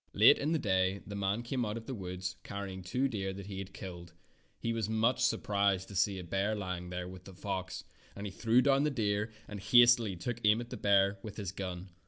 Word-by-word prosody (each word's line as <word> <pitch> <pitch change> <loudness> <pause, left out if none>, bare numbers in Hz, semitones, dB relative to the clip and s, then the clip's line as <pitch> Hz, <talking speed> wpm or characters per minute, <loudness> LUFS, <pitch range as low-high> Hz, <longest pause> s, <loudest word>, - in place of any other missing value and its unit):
Late - - +7
in 150 +3 0
the 165 - +3
day 95 -5 +1
the 105 - -7
man 100 +3 -1
came 125 +1 -1
out 105 0 -2
of 115 - -8
the 130 - -4
woods 90 -3 -5
carrying 100 -2 -6
two 125 +9 0
deer 95 -6 -3
that 100 0 -8
he 95 -1 -6
had 95 0 -6
killed. 85 -3 -9 0.5
He 115 - -1
was 110 -2 -2
much 110 +3 +2
surprised 100 -4 +1
to 100 - -9
see 100 +2 +2
a 90 - -5
bear 95 +5 0
lying 90 -3 -4
there 90 0 -4
with 90 0 -10
the 95 - -11
fox, 95 -1 -4 0.3
and 100 - -6
he 100 - -4
threw 115 +5 +3
down 140 0 +4
the 150 - +2
deer 105 -4 0 0.2
and 105 - -6
hastily 120 -2 +5
took 120 +7 -4
aim 105 +2 +5
at 120 0 -7
the - - -3
bear 100 0 +3
with 105 -1 -8
his 100 -5 -3
gun. 95 -1 -6
100 Hz, 235 wpm, -32 LUFS, 95-115 Hz, 0.5 s, Late